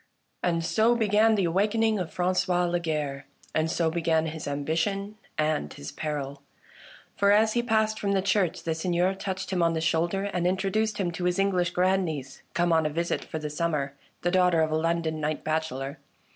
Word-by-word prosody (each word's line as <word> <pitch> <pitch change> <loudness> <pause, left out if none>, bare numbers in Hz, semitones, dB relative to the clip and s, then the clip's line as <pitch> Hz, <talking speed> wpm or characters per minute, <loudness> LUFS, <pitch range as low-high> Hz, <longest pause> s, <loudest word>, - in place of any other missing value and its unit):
And 170 -2 0
so 225 +5 +3
began 220 0 +4
the 200 - +1
awakening 210 +5 +2
of 175 -3 -4
Franqois 180 0 +1
Lagarre; 155 -5 -2 0.3
and 155 +1 +1
so 160 0 +1
began 165 -1 +1
his 160 -1 -5
ambition 165 +8 -1 0.2
and 155 -1 0
his 145 - -8
peril. 140 -2 -4 0.7
For, 200 0 +3
as 215 +1 +4
he 240 - +2
passed 220 -2 +1
from 200 -1 0
the 195 - +2
church, 195 -3 +1
the 165 - 0
Seigneur 175 +3 +1
touched 190 0 -4
him 180 - +1
on 165 0 +3
the 160 - -1
shoulder 170 +4 +1
and 180 -3 -1
introduced 195 +4 0
him 180 -3 -1
to 175 +1 -4
his 180 0 +1
English 185 -3 +2
grandniece, 175 -7 0
come 175 0 +2
on 160 -1 +3
a - - -2
visit 170 +3 -1
for - - -6
the 150 -1 -4
sum 170 +2 -1
mer, 140 -2 -1 0.3
the 175 - +1
daughter 180 -3 +4
of 155 - -1
a - - +1
London 160 -1 0
knight 150 +1 -2
bachellor. 155 -3 -2
175 Hz, 190 wpm, -27 LUFS, 160-195 Hz, 0.7 s, began